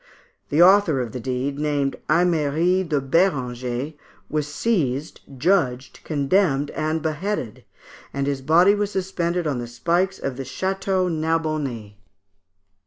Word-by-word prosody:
The 155 +4 +5
author 185 -6 +5
of 120 -3 -3
the 125 - -5
deed, 130 +3 -3
named 145 -2 0
Aimeri 170 +1 +2
de 155 -5 0
Bérenger, 130 -3 0 0.4
was 150 -1 -1
seized, 150 - -1 0.2
judged, 130 -5 0
condemned, 145 -1 +1
and 155 0 -2
beheaded, 160 - -3 0.5
and 140 0 -2
his 140 -1 -2
body 170 +8 +5
was 205 -1 -1
suspended 180 -3 -2
on 140 -5 -1
the 120 - -5
spikes 175 +10 0
of 130 -2 -4
the 135 - -4
Château 190 +6 -1
Narbonnais. 155 - -2
155 Hz, 125 wpm, -23 LUFS, 135-180 Hz, 0.5 s, The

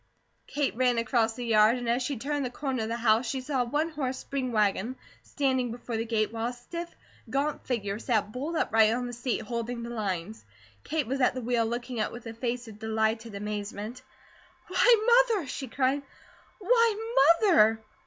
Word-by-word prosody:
Kate 285 -5 -1
ran 250 -1 +2
across 230 -1 +1
the 245 - -5
yard 220 +1 +5
and 245 -1 -5
as 240 +2 +1
she 260 +1 -2
turned 285 +4 -2
the 255 - -2
corner 260 -1 -3
of 220 - -3
the 230 - -2
house 230 +1 +3
she 265 - -2
saw 260 0 -1
a - - 0
one 295 +7 0
horse 270 -5 -3
spring 265 -2 -3
wagon 215 +2 +1 0.3
standing 260 -3 0
before 240 0 -5
the 225 +1 -1
gate, 225 -1 0
while 225 0 -2
a 245 - -3
stiff, 340 +8 -7 0.4
gaunt 285 +2 -1
figure 205 -5 -2
sat 220 -4 0
bolt 285 +8 -4
upright 220 -7 +4
on 245 +2 -1
the 245 - -6
seat, 240 -1 -2
holding 235 +1 -4
the 235 - -6
lines. 205 -2 -3 0.4
Kate 310 -3 -1
was 270 +3 -2
at 250 - +3
the 255 - -3
wheel 235 -1 +1
looking 240 +1 -4
up 215 - 0
with 240 0 -10
a 225 - -6
face 240 +1 -3
of 215 -1 -11
delighted 220 0 -1
amazement. 210 +3 -5 0.7
"Why, 475 +1 +6
Mother!" 410 -8 0
she 265 0 -5
cried. 265 +3 0 0.6
"Why, 455 +1 +2 0.3
Mother!" 225 - +5
245 Hz, 195 wpm, -28 LUFS, 225-270 Hz, 0.7 s, Why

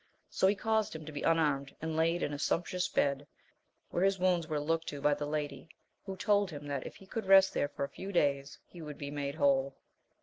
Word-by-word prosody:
So 190 - +3
he 200 - +3
caused 220 -3 0
him 160 -1 -7
to 155 - -7
be 145 - -5
unarmed, 150 -4 +1
and 160 0 -3
laid 165 +2 +1
in 145 - -2
a 145 - -5
sumptuous 180 +3 0
bed, 140 0 0 0.6
where 175 - 0
his 195 0 +3
wounds 180 -3 +1
were 155 -2 -1
looked 165 +2 -1
to 145 - -5
by 145 +1 +3
the 145 0 -3
lady, 150 -1 -4 0.4
who 190 -1 -5
told 205 0 +2
him 145 -3 -8
that 140 -2 -3
if - - -10
he 195 - -15
could 210 +1 -5
rest 195 0 +7
there - - +1
for 140 - -4
a - - -1
few^ 190 +7 -7
days, 140 -5 +1
he 175 - -12
would 150 -2 -7
be 140 -1 -6
made 140 -1 -3
whole. 135 -3 +2
155 Hz, 235 wpm, -32 LUFS, 145-185 Hz, 0.6 s, rest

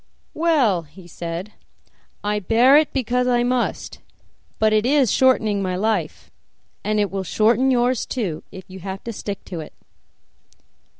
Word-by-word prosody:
"Well," 280 - +2
he 165 +4 -16
said, 170 +4 -6 0.7
"I 210 0 0
bear 230 +7 +4
it 305 0 +4
because 250 -1 0
I 240 -1 +2
must; 245 0 -2 0.6
but 220 0 +2
it 215 -1 +3
is 270 -2 +3
shortening 220 -6 +2
my 185 -1 -2
life, 195 -5 -2 0.5
and 215 0 0
it 205 -1 0
will 195 0 -2
shorten 230 +8 +2
yours 250 -1 +1
too 195 - -3
if 190 - -10
you 190 0 -10
have 190 +1 -7
to 230 - -5
stick 200 -1 -6
to 175 - -6
it." 155 - -9
215 Hz, 155 wpm, -21 LUFS, 190-250 Hz, 0.7 s, bear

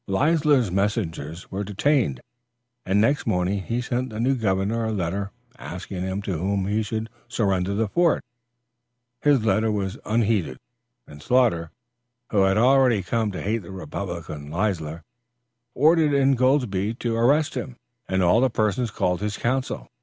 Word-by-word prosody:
Leisler's 145 - +2
messengers 90 -5 -2
were 100 +2 -3
detained, 105 - +1 0.7
and 95 +2 +3
next 130 +7 +2
morning 90 +2 0
he 115 +5 -2
sent 125 +1 -2
the 110 -1 -7
new 130 +4 +2
governor 110 -1 0
a 110 - -1
letter 100 0 -2 0.3
asking 90 +1 -6
him 95 +2 -3
to 95 -5 -3
whom 95 +2 0
he 105 +3 0
should 110 +1 -3 0.2
surrender 100 -4 0
the 110 +1 +1
fort. 170 - +2 1.0
His 140 -6 +3
letter 110 +2 +2
was 100 -2 -3
unheeded, 105 - 0 0.5
and 75 0 -13
Sloughter, 110 -8 +2 0.6
who 100 - +3
had 95 +1 +2
already 125 -3 +4
come 110 +3 -1
to 90 - -5
hate 110 +3 0
the 85 - -12
republican 85 -4 -6
Leisler, 85 -3 -2 0.7
ordered 155 +1 +4
Ingoldsby 130 -6 +2
to 120 -1 -2
arrest 140 +7 +3
him 130 -2 -5 0.3
and 95 0 +1
all 90 +7 +4
the 130 - +3
persons 110 +1 0
called 90 -2 -1
his 105 0 -2
council. 130 +2 -2
105 Hz, 150 wpm, -24 LUFS, 95-120 Hz, 1.0 s, already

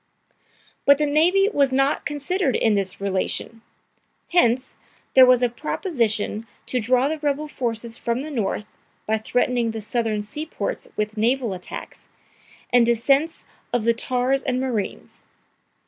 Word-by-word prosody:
"] - - -34
But 280 0 +7
the 300 - +1
navy 340 +7 +3
was 280 -2 +3
not 270 +2 +1
considered 295 0 -1
in 220 - +2
this 195 -2 -1
relation. 200 +3 -2 0.7
Hence, 260 -7 +2 0.4
there 260 -1 +8
was 250 -1 +5
a - - +5
proposition 230 - -1 0.2
to 255 - -1
draw 250 +4 +2
the 310 +1 -3
rebel 295 0 -1
forces 235 -4 -3
from 235 +1 -2
the 305 +2 -6
North, 210 -4 -2 0.4
by 220 0 0
threatening 245 +1 0
the 225 0 -4
Southern 220 -1 -1
seaports 305 - -4
with 210 +1 -3
naval 235 0 +1
attacks, 180 -1 -8 0.6
and 245 -1 +6
descents 270 +7 +2 0.3
of 245 -2 0
the 235 - +4
tars 255 +3 0
and 255 -2 -1
marines. 240 -6 -4
250 Hz, 145 wpm, -23 LUFS, 225-280 Hz, 0.7 s, there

